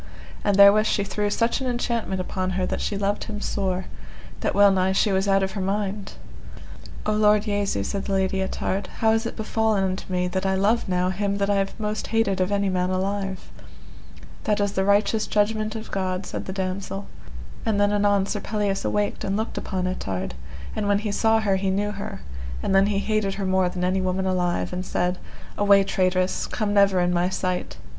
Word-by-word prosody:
And 205 - +2
therewith 200 +2 +7
she 200 - +1
threw 205 +1 -1
such 230 +5 0
an 260 - -2
enchantment 235 -5 -1
upon 185 0 -2
her 185 - +1
that - - -2
she 205 - -2
loved 200 +1 -1
him 210 -1 -5
sore, 190 -3 -2 0.5
that - - -1
well 200 0 +7
nigh 190 0 +2
she 200 +2 +2
was 190 +1 +1
out 195 0 +3
of 190 - -1
her 195 - -4
mind. 200 +1 -2 0.9
O 215 - +1
Lord 210 -1 +4
Jesu, 205 - -1
said 195 - -3
the 200 - -2
Lady 190 0 +1
Ettard, 190 0 -2
how 220 -1 +3
is 225 +1 +1
it - - -6
befallen 220 -2 0
unto 185 0 -3
me 180 0 +1
that 185 +1 -2
I 190 0 +1
love 205 +3 +1
now 180 0 +1
him 200 +1 -1
that 200 0 +1
I 200 - +2
have 195 +3 -2
most 210 -1 -2
hated 220 -4 +1
of 185 +2 +1
any 200 0 +1
man 180 -1 0
alive? 195 0 -2 0.9
That 210 -1 +1
is 205 -1 +1
the 190 - 0
righteous 210 +2 +2
judgment 215 +1 0
of 220 0 -7
God, 185 -1 -2
said - - -5
the - - -3
damosel. 195 +1 -3 0.6
And 210 -2 0
then 205 0 +3
anon 205 -1 +3
Sir 210 - -3
Pelleas 205 -1 -1
awaked 205 0 -1
and 195 +1 -1
looked 220 +1 -3
upon 185 -2 -3
Ettard; 95 - -3 0.4
and 205 - -1
when 205 0 +3
he 210 0 -2
saw 225 +2 +3
her 200 -3 +2
he 190 0 -1
knew 205 +2 0
her, 200 - -6 0.4
and - - 0
then 195 +1 +5
he 205 -1 0
hated 205 -1 0
her 195 -1 -3
more 185 -1 +2
than 180 0 -4
any 185 +1 +1
woman 185 +1 -1
alive, 180 -1 0
and 180 0 -3
said: 180 0 -1 0.4
Away, 200 -1 +6
traitress, 185 -1 0
come 210 -3 -2
never 200 -2 +4
in 175 0 +1
my 175 +1 +2
sight. 185 -1 -3
195 Hz, 210 wpm, -24 LUFS, 185-210 Hz, 0.9 s, therewith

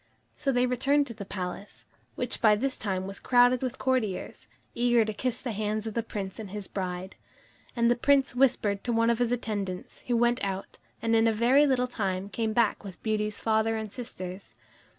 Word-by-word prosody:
So 280 -2 0
they 245 -1 +3
returned 275 +4 +2
to 240 - -6
the 205 -2 -8
palace, 185 +1 -6 0.3
which - - -3
by 215 -2 +6
this 260 +5 -2
time 190 -3 -2
was 195 +1 -7
crowded 245 0 +4
with 255 0 -3
courtiers, 250 -8 -1 0.3
eager 240 -1 +3
to 215 - -3
kiss 250 +3 -2
the 250 - -2
hands 215 +1 -2
of 220 - -4
the 230 - 0
Prince 200 -4 -6
and 215 -3 -6
his 205 -1 -6
bride. 185 0 -4 0.6
And 235 -1 +3
the - - +4
Prince 270 +2 +3
whispered 225 -6 +2
to 245 - 0
one 230 0 +3
of 235 - -1
his 245 -1 +1
attendants, 205 -6 -3
who 240 -1 +2
went 240 +1 +2
out, 195 -1 -4 0.2
and 230 0 +2
in 225 0 +4
a - - +4
very 250 +7 +4
little 255 -2 +2
time 195 -5 -2
came 220 +1 -1
back 220 -2 +1
with 190 -5 -10
Beauty's 210 -1 -1
father 220 0 +1
and 220 -2 -5
sisters. 185 - -7
225 Hz, 200 wpm, -28 LUFS, 200-245 Hz, 0.6 s, by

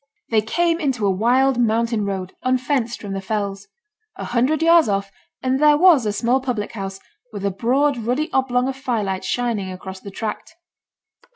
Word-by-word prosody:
They 220 -1 +4
came 335 +9 0
into 265 -9 -1
a 195 - +3
wild 245 +6 +2
mountain 230 -1 +1
road, 190 -2 -4
unfenced 255 -1 0
from 200 -2 -6
the 195 - -3
fells. 200 -1 -3 0.5
A - - -6
hundred 260 +6 +1
yards 330 -6 +5
off, 195 0 -1 0.3
and 260 +1 +1
there 300 0 +5
was 315 -9 +5
a - - +1
small 240 +5 +1
public 245 -6 -3
house, 195 -2 -6 0.3
with 200 -2 -5
a 200 - +1
broad 255 +7 +1
ruddy 250 +7 -2
oblong 255 -1 +1
of 270 - -3
firelight 220 -8 -2
shining 215 -3 -2
across 190 +1 -8
the 200 - -9
tract. 210 +2 -6
235 Hz, 175 wpm, -21 LUFS, 200-265 Hz, 0.5 s, yards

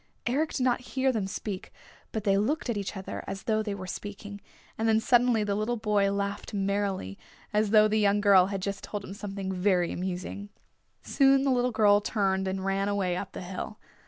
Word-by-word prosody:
Eric 290 +6 0
did 260 - -1
not 250 -1 +2
hear 260 +1 0
them 215 -6 -2
speak, 195 -1 -5 0.4
but 220 - -3
they 195 -2 +3
looked 245 +6 0
at - - -2
each 200 0 -4
other 190 - -6
as 195 - -5
though 220 -1 +1
they 210 -2 -3
were 185 -2 -7
speaking, 205 +2 -7 0.3
and 225 0 0
then 220 0 +4
suddenly 245 -2 +3
the 205 -1 -1
little 215 +4 -1
boy 210 -2 +1
laughed 200 +1 -3
merrily, 195 - -1 0.3
as 210 0 +2
though 215 0 +6
the 215 0 +1
young 205 0 +3
girl 195 -3 +6
had 195 -2 -4
just 200 0 -3
told 205 -1 -5
him 190 - -7
something 195 -2 -5
very 180 -2 +1
amusing. 185 +3 -4 0.5
Soon 270 -1 +4
the 250 -2 +2
girl 210 -2 +4
turned 195 -3 0
and 190 0 -3
ran 195 +1 0
away 195 -3 0
up 190 +1 -5
the - - -6
hill. 190 +3 -6
205 Hz, 200 wpm, -28 LUFS, 195-220 Hz, 0.5 s, though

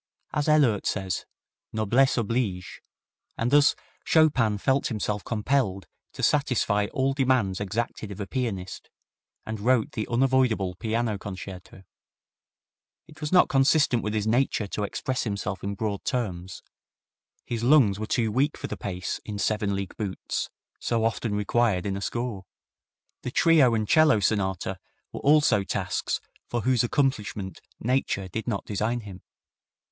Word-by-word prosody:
As 150 0 0
Ehlert 135 -10 +3
says, 95 -2 -2 0.4
"Noblesse 115 +6 +2
oblige 110 -5 -2 0.6
and 115 +2 0
thus 145 0 +5 0.3
Chopin 130 -10 +3
felt 135 +6 +1
himself 105 -3 -2
compelled 110 - 0 0.3
to - - -7
satisfy 125 -8 +2
all 135 +1 +1
demands 130 -9 +1
exacted 110 +1 -3
of 100 - -8
a 100 - -3
pianist, 100 -6 -4 0.6
and 110 -1 -4
wrote 120 +1 +2
the 110 - -3
unavoidable 120 -6 +2
piano 110 +1 -1
concerto. 95 -1 -9 1.2
It 155 +1 -17
was 150 - -3
not 180 -1 +6
consistent 135 -2 +3
with 105 0 -3
his 105 -1 0
nature 115 -1 +1
to 105 - -3
express 130 +5 -2
himself 100 -3 -3
in 100 +1 -3
broad 100 -1 -3
terms. 95 -8 -3 0.8
His 115 -1 -3
lungs 120 -7 +5
were 110 - -3
too 115 -2 +1
weak 140 +7 +1
for - - -6
the - - -4
pace 90 -2 -4
in 105 -1 -5
seven 105 -1 0
league 95 -1 -5
boots, 100 -4 -3 0.3
so 115 -2 0
often 115 -1 -1
required 105 -2 +1
in 100 -1 -1
a 100 - -4
score. 115 -3 -3 0.8
The - - -4
trio 140 -4 +4
and 110 -1 -1
'cello 155 -5 +5
sonata 95 -2 -1 0.3
were - - -6
also 145 -8 +4
tasks - - -2 0.3
for 120 - -2
whose 125 +1 +2
accomplishment 110 -7 -1 0.2
Nature 120 -5 0
did 110 +6 -5
not 100 -5 -2
design 110 +4 -1
him. 95 -3 -10
110 Hz, 145 wpm, -26 LUFS, 100-130 Hz, 1.2 s, not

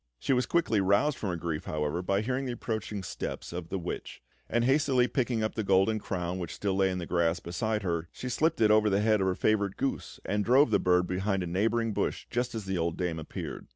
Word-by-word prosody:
She 135 - 0
was 125 0 +1
quickly 155 -12 +2
roused 100 +10 +3
from 105 - -2
her 90 - -1
grief, 80 -2 -3
however, 75 +2 -1
by 100 +2 +1
hearing 130 +4 -1
the 125 - -2
approaching 110 -4 -4
steps 85 - -5
of 85 -1 -5
the 95 - -2
witch; 90 -1 -5 0.3
and 120 0 +1
hastily 135 -2 +3
picking 120 -3 0
up 110 - -1
the 110 - -2
golden 95 +3 +3
crown 90 -2 -3
which 85 - -5
still 100 -2 -1
lay 95 0 +3
in 90 - -2
the 90 - -4
grass 85 0 +1
beside 105 +6 -2
her, 85 -2 -2
she 125 - -7
slipped 155 +4 +1
it 105 -1 +5
over 110 0 +5
the 100 +1 +2
head 110 -1 +3
of 95 - +2
her 95 - +1
favourite 100 -2 +1
goose 135 - -3
and 105 +1 0
drove 130 +7 +5
the - - +4
bird 90 0 +3
behind 95 +2 -1
a - - -3
neighbouring 110 +6 0
bush - - -2
just 120 0 -1
as 110 -3 -4
the 95 -2 -1
old 85 0 -1
dame 90 -3 -2
appeared. 80 - -6
100 Hz, 240 wpm, -29 LUFS, 90-115 Hz, 0.3 s, it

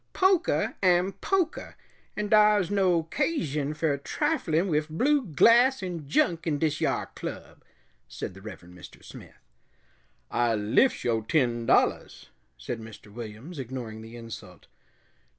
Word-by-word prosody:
"Pokah 375 -2 +2
am 180 0 +3
pokah, 370 -5 -2 0.4
and 210 -1 -3
dar's 210 -4 +5
no 185 -5 +2
'casion 155 - -2
fer 150 -3 0
triflin' 190 - 0
wif 155 -2 0
blue 275 - +2
glass 235 - +4
'n 170 -5 -5
junk 165 +3 +1
in 150 -2 +1
dis 155 0 -1
yar - - -1
club," - - -8 0.4
said - - -6
the 95 - -13
Reverend 90 -4 -11
Mr. 90 - -14
Smith. - - -13 0.9
"I 120 -1 +1
liffs 105 - +2
yo' 115 -2 +1
ten 120 -2 0
dollahs," - - +1 0.3
said 120 - -5
Mr. 110 -2 -12
Williams, 120 +8 -8
ignoring 120 -4 -6
the 115 +1 -11
insult. 115 -1 -10
155 Hz, 135 wpm, -27 LUFS, -, 0.9 s, dar's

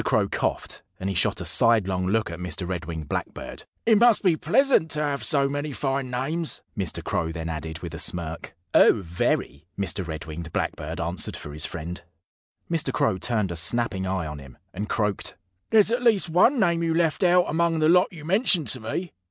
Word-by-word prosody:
Crow - - +2
coughed; - - -3 0.2
and 95 - -3
he - - -4
shot - - +2
a - - -5
sidelong 95 -5 +3
look 110 -1 0
at 85 - -7
Mr. 90 0 -4
Red 90 -3 -4
winged 80 -2 -6
Blackbird. - - -5 0.2
"It 220 -2 +5
must 235 -2 +5
be 180 -4 +4
pleasant 215 - +2
to 150 -1 0
have 145 -1 -2
so 140 -2 +2
many 145 +1 -3
fine 135 -1 -2
names," 150 +7 -3
Mr. 95 -6 -2
Crow 80 0 -1
then 80 0 -5
added, 80 0 -5
with - - -6
a - - -6
smirk. 85 -1 0 0.2
"Oh, 105 - +5
very!" 80 -2 -2
Mr. 95 -2 -2
Red 80 0 -6
winged 80 +1 -7
Blackbird 80 +4 -3
answered 85 +1 0
for 75 - -9
his 80 +2 +1
friend. 85 +2 -6 0.7
Mr. 165 -2 0
Crow 140 -11 +1
turned 105 -3 -1
a - - -4
snapping 95 +2 0
eye 95 -2 -1
on 75 -1 -6
him, 65 -3 -13 0.2
and 105 +3 -5
croaked: 105 -3 -1 0.3
"There's 220 -1 +5
at 240 +1 0
least 220 -7 +3
one 210 - +4
name 170 -5 +2
you 165 -1 0
left 165 +1 +1
out 180 0 +5
among 165 +1 +1
the 155 0 +3
lot 180 +2 +5
you 155 -4 -11
mentioned 185 - +1
to 130 - +3
me. 170 +10 -4
115 Hz, 200 wpm, -25 LUFS, -, 0.7 s, It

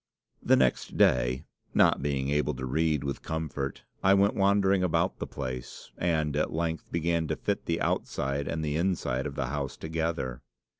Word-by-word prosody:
"The - - +5
next 65 -2 +1
day, 65 +3 +3 0.3
not - - +5
being 70 -1 -1
able 75 0 +1
to 65 0 -4
read 75 +2 +1
with 70 -1 -3
comfort, 75 -4 -4 0.2
I 95 +1 +5
went 100 +1 +4
wandering 100 -1 +3
about 90 -3 +1
the - - -3
place, 65 -3 -6
and 80 -4 0
at 75 - 0
length 80 0 -2
began 85 -1 0
to - - -1
fit - - -2
the - - 0
outside 70 +1 -1
and 80 -1 -2
inside 75 -4 0
of 70 - -7
the 70 -4 -2
house 70 -1 -3
together. 80 -6 -2
75 Hz, 165 wpm, -29 LUFS, 70-85 Hz, 0.3 s, The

